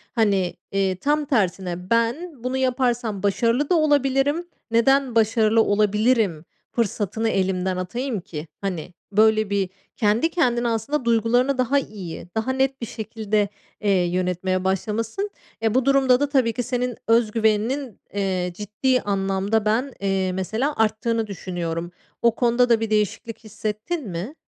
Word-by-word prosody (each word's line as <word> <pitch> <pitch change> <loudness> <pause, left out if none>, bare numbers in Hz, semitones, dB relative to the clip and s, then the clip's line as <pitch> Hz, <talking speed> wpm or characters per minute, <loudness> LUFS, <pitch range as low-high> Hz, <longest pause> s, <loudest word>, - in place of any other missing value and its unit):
Hani, 200 -6 +2 0.2
eee, 195 -1 +1
tam 295 +10 0
tersine 185 - -1
ben 240 +5 0
bunu 255 +1 -1
yaparsam 245 -5 0
başarılı 230 +7 +1
da 360 - +4
olabilirim. 290 +1 +2 0.2
Neden 260 +2 +3
başarılı 225 0 +4
olabilirim, 210 -4 +2 0.3
fırsatını 225 0 -1
elimden 185 -2 0
atayım 235 +6 -3
ki?" 165 -3 -7
Hani, 180 -3 -4 0.2
böyle 215 0 +4
bir 200 -2 0 0.3
kendi 220 +8 +2
kendine 245 -8 +1
aslında 235 +4 -1
duygularını 235 +4 +2
daha 260 +3 +2
iyi, 190 -10 -7
daha 220 +4 0
net 265 0 0
bir - - -2
şekilde, 215 -2 -1 0.3
eee, 210 - 0
yönetmeye 180 0 0
başlamışsın. 225 - -1 0.3
E, 220 -1 +2
bu 255 0 +2
durumda 270 -2 +4
da 290 0 0
tabii 260 -5 +2
ki 245 +2 -2
senin 245 0 -2
öz 230 -1 +3
güveninin, 225 +3 0
eee, 190 -3 -1
ciddi 215 +6 0
anlamda 195 +2 0
ben, 240 +5 +1
eee, 195 -1 0
mesela 220 +10 -1
arttığını 225 +1 +1
düşünüyorum. 175 -3 -4 0.3
O 235 -1 +3
konuda 245 0 +3
da 230 -1 +4
bir 225 -1 -2
değişiklik 215 +2 -1
hissettin 215 - -4
mi? 185 - -5
220 Hz, 140 wpm, -23 LUFS, 195-250 Hz, 0.3 s, da